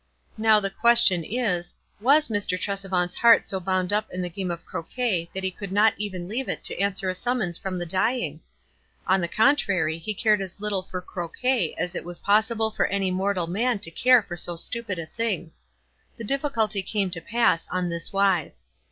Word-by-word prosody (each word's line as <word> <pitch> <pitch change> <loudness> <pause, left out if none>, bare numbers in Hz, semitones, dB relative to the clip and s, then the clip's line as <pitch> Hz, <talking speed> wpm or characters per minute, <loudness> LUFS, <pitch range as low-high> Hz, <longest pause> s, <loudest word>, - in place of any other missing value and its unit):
Now, 220 -1 +5
the 195 -1 -3
question 230 -5 +5
is, 180 -5 -2 0.2
was 285 +7 +4
Mr. 205 -4 -1
Trescvant's 190 -3 -1
heart 235 -1 +6
so 190 - -1
bound 185 +1 -1
up 215 +1 0
in 180 0 -4
the 175 - -4
game 185 +1 -4
of 170 -1 -5
croquet 180 -3 -3
that 190 - -5
be 190 0 -2
could 195 +1 -8
not 210 +3 +4
even 185 -4 -5
leave 245 +6 -3
it - - -4
to - - -3
answer 195 -1 0
a 185 - 0
summons 205 -4 -2
from 190 -1 -4
tho 175 - -3
dying? 185 - 0 0.6
On 190 +1 +2
the 170 - -1
contrary 195 - +2
he 210 +6 -3
cared 210 -1 +2
as 190 0 -7
little 205 -2 -1
for 185 -1 -7
croquet 185 +3 -2
as 180 - -2
it - - -4
was 175 0 -5
possible 220 +2 +1
for - - 0
any 195 -1 -1
mor 195 +2 0
tal 180 -2 0
man 220 +7 0
to 180 -5 -3
care 250 +3 +4
for 175 - -7
so 175 0 0
stupid 215 +2 -1
a 165 - -5
thing. 185 -4 -3 0.7
The 230 - -6
difficulty 225 -5 0
came 195 0 -1
to 165 -2 -2
pass, 230 -4 +1
on 180 -1 -1
this 170 0 -4
wise. 185 - 0
195 Hz, 200 wpm, -25 LUFS, 180-220 Hz, 0.7 s, heart